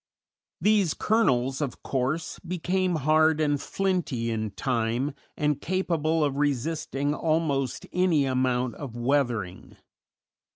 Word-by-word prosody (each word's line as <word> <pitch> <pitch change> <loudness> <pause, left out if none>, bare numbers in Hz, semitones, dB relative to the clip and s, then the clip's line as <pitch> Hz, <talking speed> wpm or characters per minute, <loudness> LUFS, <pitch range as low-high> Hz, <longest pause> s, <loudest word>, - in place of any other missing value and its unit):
These 205 -6 +3
kernels, 135 - +1
of 140 -4 -4
course, 135 +5 -2
became 180 +1 -1
hard 155 0 +4
and 145 -2 +1
flinty 175 -12 -1
in 110 -1 -2
time, 120 +5 -1 0.2
and 150 -1 0
capable 165 -3 0
of 140 -2 0
resisting 145 0 -1
almost 150 -5 0
any 175 -6 +3
amount 130 -1 0
of 135 -6 -7
weathering. 120 -7 -1
145 Hz, 110 wpm, -26 LUFS, 125-165 Hz, 0.2 s, hard